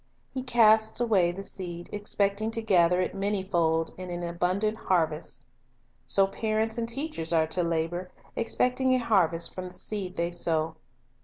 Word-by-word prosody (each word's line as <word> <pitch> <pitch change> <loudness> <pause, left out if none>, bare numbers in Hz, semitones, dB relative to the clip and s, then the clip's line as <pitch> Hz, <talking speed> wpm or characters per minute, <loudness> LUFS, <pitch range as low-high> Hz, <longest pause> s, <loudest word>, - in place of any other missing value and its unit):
He 260 - -3
casts 220 -3 +4
away 200 -8 +3
the 195 +3 -7
seed, 175 -3 -5
expecting 205 +1 0
to - - 0
gather 180 -4 +3
it 180 - -2
many 200 0 -1
fold 165 -3 +1
in 185 -1 -6
an 175 0 -4
abundant 180 +5 0
harvest. 160 -6 -1 0.6
So 195 - +5
parents 220 +3 -1
and 230 0 -1
teachers 270 - -1
are 160 -1 +3
to 160 +3 0
labor, 170 +2 -2 0.3
expecting 250 +2 +2
a - - +3
harvest 175 -8 +1
from 185 0 -6
the 180 - -17
seed 190 -1 -4
they 170 +1 0
sow. 160 -2 0
185 Hz, 160 wpm, -27 LUFS, 170-220 Hz, 0.6 s, So